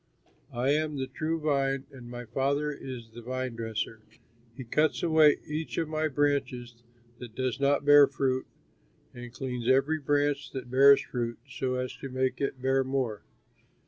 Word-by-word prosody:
"I 125 +3 +1
am 150 0 0
the 135 - -2
true 160 +4 -3
vine 135 -3 0
and 125 -3 -11
my 120 0 -7
Father 140 +5 0
is 125 -5 -8
the 120 +1 -10
vine 130 0 -4
dresser. 110 -1 -4 0.6
He 130 - -6
cuts 150 +6 +1
away 160 -3 +5
each 155 +2 -4
of 165 - 0
my 155 0 -1
branches 130 -5 -1 0.4
that 120 -3 -10
does 130 -1 -2
not 140 +1 +2
bear 145 -1 +8
fruit, 130 -1 -1 0.7
and 120 -1 -9
cleans 125 -2 -5
every 140 +4 +3
branch 145 0 0
that 125 -2 -6
bears 140 +2 +7
fruit 120 -2 -3
so 130 -1 -2
as 125 0 -3
to 135 - -7
make 130 +1 -1
it 135 -1 -2
bear 135 0 +2
more. 130 -7 -2
135 Hz, 165 wpm, -28 LUFS, 125-145 Hz, 0.7 s, bear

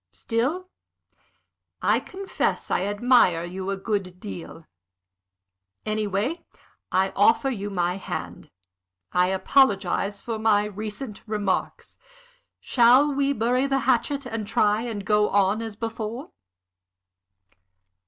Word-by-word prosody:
Still, 270 +11 -2 1.1
I - - +2
confess, 385 +1 -3
I 185 - +1
admire 205 -5 +3
you 185 +2 -5
a 195 - -2
good 190 -3 -3
deal. 170 -5 -9 1.2
Anyway, 215 - -1 0.5
I 190 +1 +2
offer 230 +6 +3
you 205 -4 -4
my 180 -1 -1
hand. 195 - -6 0.6
I 180 0 +3
apologize 200 -1 +2
for 225 0 -5
my 210 -2 +3
recent 210 +2 -6
remarks. 205 -3 -2 0.6
Shall 255 +4 +4
we 280 0 +1
bury 250 +2 +1
the 270 -1 +1
hatchet, 270 +3 +1
and 225 -4 -4
try 210 -1 +2
and 220 -4 -5
go 210 -1 +3
on 200 +2 +2
as 225 -2 -6
before?" 225 +3 -5
215 Hz, 110 wpm, -25 LUFS, 195-245 Hz, 1.2 s, Shall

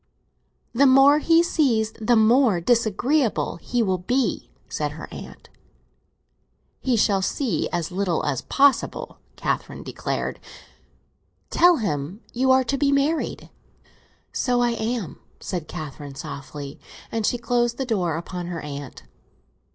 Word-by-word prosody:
"The 275 +4 +5
more 270 +3 +6
he 330 +2 +4
sees 240 -10 +1
the 235 +2 +3
more 225 -2 +4
disagreeable 235 - +1
he 240 +7 -1
will 190 -3 0
be," 250 +9 -1 0.2
said - - -3
her - - -8
aunt. - - -10 1.3
"He 255 -3 +1
shall 200 -2 +3
see 210 - -1
as 175 +1 -2
little 180 -3 -1
as 135 -4 -1
possible!" 280 0 +1 0.2
Catherine - - -3
declared. - - -3 1.1
"Tell 355 0 +6
him 175 - -3
you 260 +2 +1
are 260 0 +5
to 275 +2 -2
be 285 -1 +3
married." 285 +3 0 0.8
"So 250 -2 +1
I 240 0 +2
am," 230 -5 -3 0.2
said 175 -5 -4
Catherine 145 -4 -7
softly; 140 +1 -8 0.3
and 225 -1 -1
she 245 - +1
closed 240 0 0
the 265 - -2
door 180 -9 0
upon 175 +1 -6
her 175 -2 -5
aunt. 140 -3 -8
225 Hz, 130 wpm, -23 LUFS, 175-260 Hz, 1.3 s, more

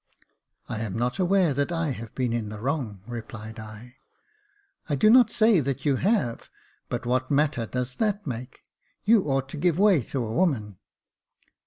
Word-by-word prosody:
" - - -46
I 110 - -4
am 110 -2 -3
not 125 +6 -1
aware 185 -4 +3
that 140 +5 -1
I 165 -2 -1
have 115 -3 -8
been 125 -3 -1
in 115 -3 -2
the 105 -1 -7
wrong," 120 -6 -3
replied 110 -1 -8
L 110 0 -9 0.5
" 410 - -34
I 145 - +1
do 215 +11 +5
not 245 -2 +7
say 220 -4 +4
that 135 0 -3
you 140 -3 +3
have; 190 - 0 0.4
but - - -3
what 130 +1 0
matter 140 -5 +1
does 125 +1 -3
that 210 -2 0
make 125 -1 -6 0.2
.'' - - -44
You 215 -2 +5
ought 135 -2 0
to 150 - -7
give 170 +1 +1
way 195 -6 +5
to 130 -4 -3
a 110 - -4
woman." 115 - 0
135 Hz, 190 wpm, -26 LUFS, 115-185 Hz, 0.5 s, not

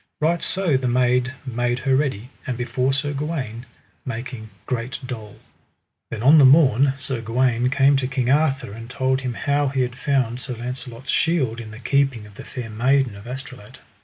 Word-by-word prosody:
Right 165 +2 +1
so 185 -7 +1
the 130 -1 -2
maid 125 +1 +2
made 120 -1 -1
her 135 +1 +1
ready, 130 -4 -1 0.2
and 125 -3 -2
before 125 +2 0
Sir 140 +2 -1
Gawaine, 135 -6 -4 0.4
making 120 -2 -6 0.2
great 120 0 -3
dole. 110 -5 -7 0.7
Then 115 -1 -5
on 150 +4 +7
the - - +7
morn 135 -1 +6
Sir 130 -3 -4
Gawaine 120 +1 +1
came 140 +1 +4
to 130 -1 -1
King 130 -1 -1
Arthur, 135 -3 +2
and 115 +2 -9
told 130 +1 0
him 125 -2 -3
how 145 +2 +1
he 135 -1 0
had 125 -1 -2
found 130 -3 0
Sir 125 -1 -5
Launcelot's 125 +1 -6
shield 130 -9 +1
in 110 - -9
the 110 - -10
keeping 135 -3 +1
of 105 - -14
the - - -10
Fair 120 -3 -7
Maiden 125 +1 +2
of 100 +3 -11
Astolat. 125 -4 -9
125 Hz, 185 wpm, -22 LUFS, 120-135 Hz, 0.7 s, on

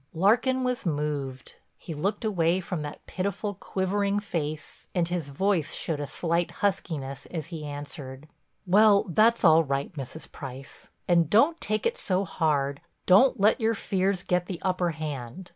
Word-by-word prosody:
Larkin 245 +9 +3
was 250 -1 -1
moved. 145 -5 -3 0.2
He 165 - -7
looked 200 +9 -2
away 180 -4 +2
from 180 -3 -4
that 145 0 -7
pitiful, 200 +2 -3
quivering 200 +2 -1
face 155 -6 -5
and 175 -2 +2
his 175 -4 -3
voice 170 +2 0
showed 160 -3 -2
a 145 - -3
slight 170 +4 -1 0.2
huskiness 140 -8 -2
as 160 -4 -5
he 160 -2 -5
answered: 145 -1 -8 0.4
"Well, 205 +2 +5
that's 225 +6 +3
all 165 -2 +7
right, 140 +2 -2
Mrs. 145 +1 -8
Price—and 140 +5 -2
don't 285 - +4
take 215 +1 -1
it 475 +1 0
so 190 - 0
hard, 140 -4 0 0.2
don't 205 +7 +5
let 210 +5 +4
your 225 +1 +2
fears 190 -2 0
get 180 0 0
the 185 - -4
upper 185 -2 +1
hand. 155 +1 -6
175 Hz, 155 wpm, -27 LUFS, 150-200 Hz, 0.4 s, all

